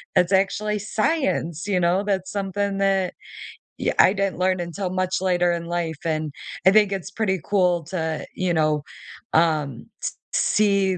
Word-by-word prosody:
that's 180 +2 +3
actually 205 +2 +1
science, 210 - -1
you 190 -3 +1
know?" 180 +3 +2
That's 190 -2 -1
something 200 0 -2
that 195 -2 +1 0.7
y - - +1
I 190 - +7
didn't 195 -4 -1
learn 185 0 +2
until 180 +2 -4
much 185 0 0
later 175 -2 +2
in 170 -1 -2
life 170 -2 -2
and 155 -2 -1 0.3
I 190 - +8
think 210 -1 +5
it's 190 -3 -5
pretty 190 -4 0
cool 180 -4 +2
to, 160 -4 -3
you 185 -2 0
know, 155 -2 +1 0.5
um, 155 -6 +1 0.2
s - - -2 0.2
see 200 -3 +2
185 Hz, 160 wpm, -23 LUFS, 170-195 Hz, 0.7 s, I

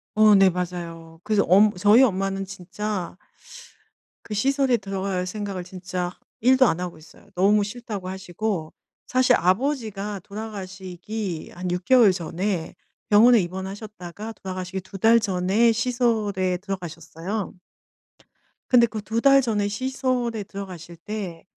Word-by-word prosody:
어, 215 -1 +6
네 195 -1 +6
맞아요. 170 -2 -6
그래서 210 0 +2
엄 200 +4 +5
저희 205 +7 +6
엄마는 195 -4 +1
진짜 195 0 -5 1.1
그 215 - -6
시설에 270 +3 +2
들어갈 195 -3 -3
생각을 195 -1 -4
진짜 180 -1 -4 0.3
1도 260 +2 +5
안 175 -5 0
하고 180 -3 -5
있어요. 160 +5 -18
너무 205 +3 +3
싫다고 205 -3 -6
하시고. 190 -2 -4 0.3
사실 255 0 +3
아버지가 210 - -1
돌아가시기 190 -2 -6
한 180 +1 -4
6 180 0 -2
개월 240 -7 +6
전에 180 0 -3 0.3
병원에 225 +3 +7
입원하셨다가 190 +2 -6
돌아가시기 185 -1 -5
2 195 +1 -10
달 225 +4 +6
전에 200 +3 +2
시설에 220 -6 0
들어가셨어요. 180 +1 -5 1.1
근데 240 -2 +6
그 220 -1 -5
2 225 +2 -1
달 275 0 +7
전에 215 -5 0
시설에 245 -1 -1
들어가실 180 -4 -9
때 190 -3 -6
200 Hz, 275 characters per minute, -24 LUFS, 180-220 Hz, 1.1 s, 병원에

